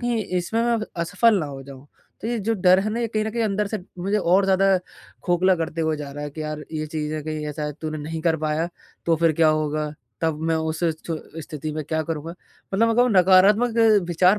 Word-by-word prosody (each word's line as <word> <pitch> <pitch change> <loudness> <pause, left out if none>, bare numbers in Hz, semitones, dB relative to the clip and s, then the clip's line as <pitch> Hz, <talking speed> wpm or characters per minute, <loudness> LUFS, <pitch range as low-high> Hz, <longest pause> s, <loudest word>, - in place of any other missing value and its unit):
कहीं 240 -4 -1
इसमें 185 +6 -1
मैं 235 -1 +2 0.2
असफल 220 +5 +3
ना 155 - -2
हो 135 -1 -8
जाऊँ। 135 0 -12 0.4
तो 225 - -2
ये 240 - -1
जो 225 +2 0
डर 185 -2 +5
है 210 +2 -1
ना 230 +2 -2
ये 235 - 0
कहीं 215 -1 -1
न 220 - -2
कहीं 235 0 0
अंदर 210 0 0
से 215 +1 -3 0.2
मुझे 200 +4 0
और 190 +1 +3
ज़्यादा 195 0 +4 0.5
खोखला 185 +1 +3
करते 165 0 -3
हुए 160 -1 0
जा 145 -1 -6
रहा 145 +1 -6
है 145 - -5
कि 155 +2 -6
यार, 150 0 -5
ये 155 -1 -3
चीज़ें 155 0 -3
कहीं 155 -1 -4
ऐसा 150 +1 -5
है 150 - -3
तूने 155 -1 -4
नहीं 160 +2 -5
कर 165 -1 +2
पाया 155 +2 -1 0.4
तो 165 -1 +3
फिर 165 0 +3
क्या 160 - +6
होगा? 155 -1 0 0.3
तब 160 -2 0
मैं - - +3
उस 160 0 -2 0.3
छ 170 - -2 0.3
स्थिति 155 +1 -6
में 155 +1 -3
क्या 160 +2 -1
करूँगा? 160 0 -4 0.4
मतलब 230 +3 +3
अग 225 - 0
वो 245 - +5
नकारात्मक 200 +4 +5 0.3
विचार 180 +4 +4
165 Hz, 235 wpm, -23 LUFS, 155-200 Hz, 0.5 s, क्या